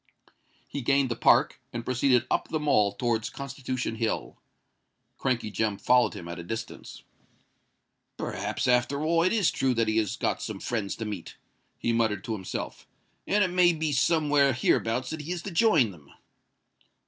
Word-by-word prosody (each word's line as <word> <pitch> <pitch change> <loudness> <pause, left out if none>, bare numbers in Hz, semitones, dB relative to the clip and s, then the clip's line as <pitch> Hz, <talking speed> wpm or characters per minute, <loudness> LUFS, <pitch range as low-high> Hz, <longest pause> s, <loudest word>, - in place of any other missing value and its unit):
He 140 - -5
gained 135 0 +2
the - - 0
Park, - - +3
and 120 0 -5
proceeded 130 -1 +2
up - - +1
the 155 - -2
Mall 135 -9 +3
towards 110 +1 -1
Constitution 130 -3 -4
Hill. 110 0 -2 0.8
Crankey 120 -5 -1
Jem 105 +1 -1
followed 125 -2 +3
him 85 - -8
at 85 0 -6
a - - -6
distance. 115 +6 -7 1.1
"Perhaps, 105 +6 -3
after 125 +4 +2
all, 165 +1 +2
it 180 - +2
is 210 -6 +2
true 130 -2 0
that 115 -1 +1
he 110 0 +1
has 110 -3 0
got - - -1
some - - -5
friends 110 -5 -3
to 115 - -5
meet," 105 -5 -6 0.4
he 115 - 0
muttered 110 -4 +1
to 115 - -3
himself; 95 -4 -6 0.4
"and 205 +1 +3
it 185 - +1
may 180 -1 +4
be 155 -1 -1
somewhere 145 -1 +3
hereabouts 125 +1 0
that 160 -1 -4
he 155 +4 -6
is 175 -1 -3
to 200 - -5
join 165 - +4
them." 75 -6 -17
125 Hz, 170 wpm, -27 LUFS, 110-145 Hz, 1.1 s, may